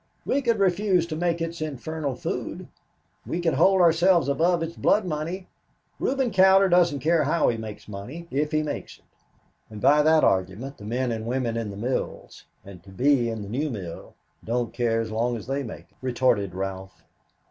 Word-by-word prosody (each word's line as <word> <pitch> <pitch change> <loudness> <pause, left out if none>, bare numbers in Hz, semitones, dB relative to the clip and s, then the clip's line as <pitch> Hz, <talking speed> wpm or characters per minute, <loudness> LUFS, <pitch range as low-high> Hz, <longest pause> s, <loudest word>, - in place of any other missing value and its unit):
"We 280 - +1
could 235 -4 +1
refuse 190 -2 +2
to 165 -2 -5
make 170 0 -1
its 165 0 -5
infernal 150 -1 -4
food. - - -5 0.6
We 170 - -3
could 170 -2 +1
hold 185 +6 +4
ourselves 170 -2 +4
above 165 +4 +2
its 165 +1 -5
blood 210 -1 +2
money. 170 +3 -4 0.5
Reuben 265 -3 0
Cowder 190 +1 +6
doesn't 170 -6 +3
care 160 +1 +2
how 165 +4 +2
he 115 - -1
makes 110 -2 -8
money 120 +12 -8
if 150 +3 0
he 155 -1 +1
makes 150 - -5
it." - - -31 0.7
"And 105 -1 -9
by 145 +7 +5
that 155 +1 +4
argument 95 +9 0
the 105 - -10
men 125 +3 -1
and 110 0 -4
women 120 -2 -1
in 115 -2 -3
the 100 - -8
mills 125 +5 -4 0.2
and 95 -3 -11
to 95 - -16
be 125 +4 +2
in 110 -2 -4
the - - -8
new 145 +7 -1
mill 95 -9 -7 0.3
don't 120 0 -2
care 115 -1 +1
as 110 -1 -5
long 120 +2 0
as 110 - -9
they 135 +2 -2
make 115 -10 -7
it," - - -34
retorted 120 -7 +1
Ralph. 95 0 -6
140 Hz, 190 wpm, -25 LUFS, 115-170 Hz, 0.7 s, Cowder